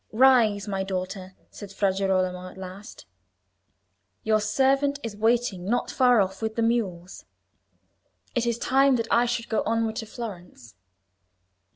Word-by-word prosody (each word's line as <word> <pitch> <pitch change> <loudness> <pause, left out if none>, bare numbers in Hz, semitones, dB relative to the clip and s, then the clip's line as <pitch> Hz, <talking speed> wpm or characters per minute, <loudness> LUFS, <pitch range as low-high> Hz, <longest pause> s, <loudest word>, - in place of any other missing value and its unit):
"Rise, 225 -5 +4
my 195 -1 -2
daughter," 185 0 -5 0.2
said 205 -2 -10
Fra 195 -1 +1
Girolamo 185 -1 -1
at - - -15
last. 190 - -10 1.2
"Your 215 -1 +2
servant 270 +6 +1
is 225 -3 -5
waiting 220 -4 0
not 240 +5 -1
far 250 -3 +4
off 190 +1 -3
with 220 0 -3
the 230 - 0
mules. 195 -7 -2 1.1
It 240 -1 0
is 235 -1 0
time 270 +2 +3
that 230 -1 -2
I 240 +1 +4
should 235 -1 -2
go 220 - 0
onward 225 -1 -1
to 225 -3 -5
Florence." 180 - -9
215 Hz, 145 wpm, -25 LUFS, 190-235 Hz, 1.2 s, Rise